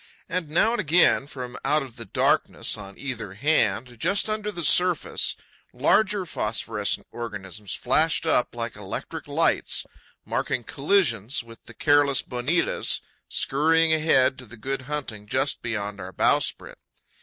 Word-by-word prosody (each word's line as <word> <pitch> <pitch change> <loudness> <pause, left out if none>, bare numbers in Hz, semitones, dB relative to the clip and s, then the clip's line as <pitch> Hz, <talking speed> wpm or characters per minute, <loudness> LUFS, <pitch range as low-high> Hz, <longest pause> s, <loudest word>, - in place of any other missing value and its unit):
And 180 -3 -3
now 175 +8 +3
and 240 - 0
again, 165 -4 +4
from 125 -3 -7
out 150 +1 +2
of 130 -4 -11
the 115 -2 -8
darkness 95 - +1
on 100 -1 -10
either 115 -8 -5
hand, 120 -3 +1
just 200 - +2
under 210 -1 -2
the 175 -4 -5
surface, 180 +3 +3 0.4
larger 205 -2 +2
phosphorescent 105 -7 -2
organisms 105 -4 -6
flashed - - +1
up - - +1
like - - -3
electric - - -6
lights, - - +1 0.4
marking 120 - -1
collisions 140 - +1
with 115 0 -15
the - - -13
careless 145 -2 +3
bonitas 125 +8 0 0.3
skurrying 160 +3 +3
ahead 155 -5 +3
to 125 - -10
the 120 +3 -13
good 135 +5 -3
hunting 120 -9 -4
just 135 +6 0
beyond 105 -3 -3
our 90 +1 -7
bowsprit. - - 0
135 Hz, 140 wpm, -25 LUFS, 115-160 Hz, 0.4 s, again